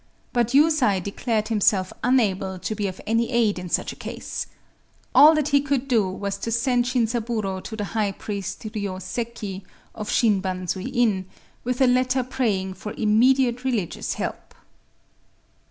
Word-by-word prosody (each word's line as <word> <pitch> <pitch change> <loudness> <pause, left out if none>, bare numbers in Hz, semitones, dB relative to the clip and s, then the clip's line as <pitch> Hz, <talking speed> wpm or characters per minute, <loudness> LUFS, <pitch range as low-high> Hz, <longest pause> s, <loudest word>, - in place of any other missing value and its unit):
But 240 0 +1
Yusai 295 -10 +4
declared 215 +3 -2
himself 200 -4 +2
unable 195 -7 +1
to 200 - -3
be 205 -1 -2
of 185 - -6
any 230 +2 +1
aid 230 -6 +2
in 180 0 -7
such - - -1
a - - -13
case. - - -6 0.7
All 310 +2 +8
that 300 -1 0
he 280 -1 +4
could 275 -2 -1
do 225 -7 +2
was 200 +1 -4
to 230 - -3
send 245 +1 +2
Shinzaburō 230 -5 -1
to 220 - -6
the 210 - -3
high 205 0 -1
priest 200 -1 -5
Ryōseki, 205 0 -4 0.3
of 210 -1 -6
Shin 210 -5 +3
Banzui 185 +3 -3
In, 220 -7 +1 0.4
with 250 +2 -2
a - - +7
letter 255 +1 +2
praying 215 -7 -1
for 210 +3 -7
immediate 245 +3 +3
religious 235 -10 -2
help. - - -5
220 Hz, 155 wpm, -24 LUFS, 195-250 Hz, 0.7 s, All